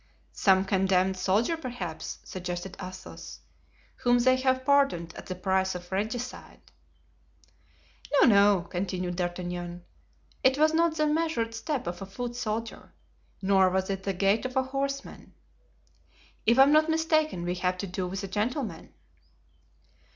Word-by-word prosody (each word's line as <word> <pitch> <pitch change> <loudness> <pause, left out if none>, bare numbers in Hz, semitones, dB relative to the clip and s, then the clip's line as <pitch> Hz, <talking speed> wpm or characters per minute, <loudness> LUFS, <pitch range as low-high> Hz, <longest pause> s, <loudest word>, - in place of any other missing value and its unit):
"Some 190 -1 +3
condemned 190 -1 +2
soldier, 200 - +1
perhaps," 255 -6 -6
suggested 180 0 -5
Athos, 185 0 -9 0.6
"whom 245 0 +3
they 255 +2 +4
have 260 0 +1
pardoned 275 -13 +2
at - - -10
the 185 - -4
price 190 0 0
of 175 0 -8
regicide." 225 +6 -5 1.4
"No, 285 - +5
no," 200 -4 +5
continued 180 -1 -3
D'Artagnan, 175 -1 -4 0.6
"it 260 +1 +4
was 310 +1 +4
not 330 0 +2
the 305 - +2
measured 300 -7 0
step 270 +4 -3
of 175 +1 -5
a 195 - -6
foot 240 +5 -5
soldier, 230 -1 -4 0.5
nor 190 -1 +4
was 190 +1 -1
it 195 0 -3
the 195 0 -2
gait 195 +4 +2
of 255 0 -5
a 265 - +3
horseman. 275 +1 -5 1.1
If 235 +2 +5
I 265 - +9
am 280 - +4
not 310 +1 +4
mistaken 310 - +1
we 175 - -1
have 180 0 0
to 200 - -4
do 185 0 -3
with 190 +2 -5
a - - -3
gentleman." 210 - -3
200 Hz, 145 wpm, -28 LUFS, 185-260 Hz, 1.4 s, I